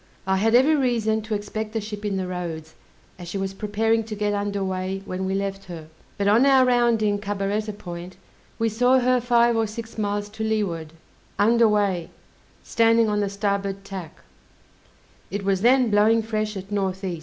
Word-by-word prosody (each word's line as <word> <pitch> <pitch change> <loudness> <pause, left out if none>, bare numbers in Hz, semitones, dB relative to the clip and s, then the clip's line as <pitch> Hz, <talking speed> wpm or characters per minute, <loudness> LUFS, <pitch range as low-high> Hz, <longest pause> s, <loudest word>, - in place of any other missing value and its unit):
I 190 0 +1
had 225 +4 +2
every 275 +6 +5
reason 230 -5 +1
to 215 0 -3
expect 215 +1 -5
the 225 - 0
ship 210 0 -7
in 200 -2 -1
the 190 - -2
roads, 165 -3 -5 0.5
as 175 - -8
she 175 - -4
was 195 0 -3
preparing 220 +3 0
to 215 -1 -6
get 210 0 -1
under 200 -1 -2
weigh 190 +1 -3
when 185 +1 -4
we 190 +1 -1
left 195 0 -3
her; 160 -3 -9 0.3
but 200 - 0
on 220 +5 +5
our 270 -2 +5
rounding 235 -4 +2
Cabaretta 205 +1 -2
Point, 175 -1 -8 0.4
we 225 - +1
saw 245 +4 +3
her 255 0 +2
five 235 -1 +3
or 225 -1 +1
six 225 +1 -8
miles 205 0 -1
to 220 +1 -6
leeward, 185 -8 -2 0.4
under 230 +2 +4
weigh, 200 -5 0 0.5
standing 230 -1 +3
on 210 0 0
the 205 -1 0
starboard 200 -1 -2
tack: 185 -3 -8 1.1
it 200 0 -4
was 195 -1 +1
then 250 0 +4
blowing 220 +2 +4
fresh 215 -1 -2
at 195 +2 -9
N. 195 -2 0
E. 175 -3 -3
205 Hz, 185 wpm, -24 LUFS, 195-225 Hz, 1.1 s, every